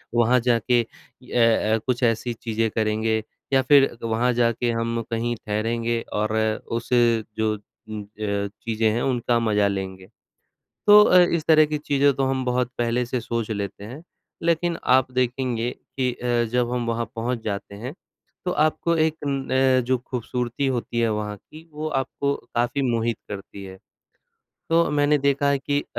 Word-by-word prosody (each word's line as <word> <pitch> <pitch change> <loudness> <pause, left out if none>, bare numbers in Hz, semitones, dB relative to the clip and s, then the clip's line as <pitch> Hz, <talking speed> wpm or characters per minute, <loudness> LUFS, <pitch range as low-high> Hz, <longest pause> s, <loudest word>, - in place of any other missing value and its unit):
वहाँ 120 +2 +4
जाके 120 0 +2
अ, 115 -2 0
कुछ 125 0 -1
ऐसी 115 +1 +1
चीज़ें 115 0 -2
करेंगे 110 0 0 0.3
या 135 - +5
फिर 135 +1 +5
वहाँ 115 +2 +1
जाके 120 0 +1
हम 115 0 -1
कहीं 120 +1 -1
ठहरेंगे 115 +2 -2
और 110 +1 0 0.4
उसे 120 -2 +2
जो 110 -1 +1
उम 105 +1 -10
अ, 100 -1 -3
चीज़ें 110 -1 0
हैं 120 +3 -1
उनका 120 -2 +1
मज़ा 105 -3 +2
लेंगे। 95 -1 -4 0.8
तो 210 0 +9
अ, 180 - +6
इस 170 -3 +1
तरह 155 -1 +6
की 150 0 -2
चीज़ें 140 -1 +2
तो 135 0 0
हम 130 -1 -1
बहुत 125 0 0
पहले 120 +1 +1
से 125 0 -2
सोच 115 -1 -3
लेते 100 -1 -4
हैं 130 +9 -9 0.4
लेकिन 170 0 +1 0.2
आप 130 0 +3
देखेंगे 125 -1 -1 0.3
कि 125 -1 +1
अ, 120 -1 0
जब 125 -1 +1
हम 120 -1 -1
वहाँ 115 0 -1
पहुँच 115 0 -2
जाते 100 -1 -4
हैं 125 +9 -7 0.5
तो 180 - -1
आपको 155 +2 +1
एक 160 0 +2
अ, 135 -2 +2
जो 130 0 +2
खूबसूरती 125 +1 -3
होती 120 -2 -1
है 115 - +2
वहाँ 105 -1 -3
की 160 - -16
वो 155 +1 -4
आपको 140 0 -1 0.2
काफ़ी 120 +4 0
मोहित 115 -1 0
करती 100 -1 -8
है। 95 0 -9 0.9
तो 165 0 +4
मैंने 145 0 +3
देखा 140 +1 +1
है 140 - +2
कि 145 +1 -1
अ, - - -11
120 Hz, 165 wpm, -23 LUFS, 110-135 Hz, 0.9 s, तो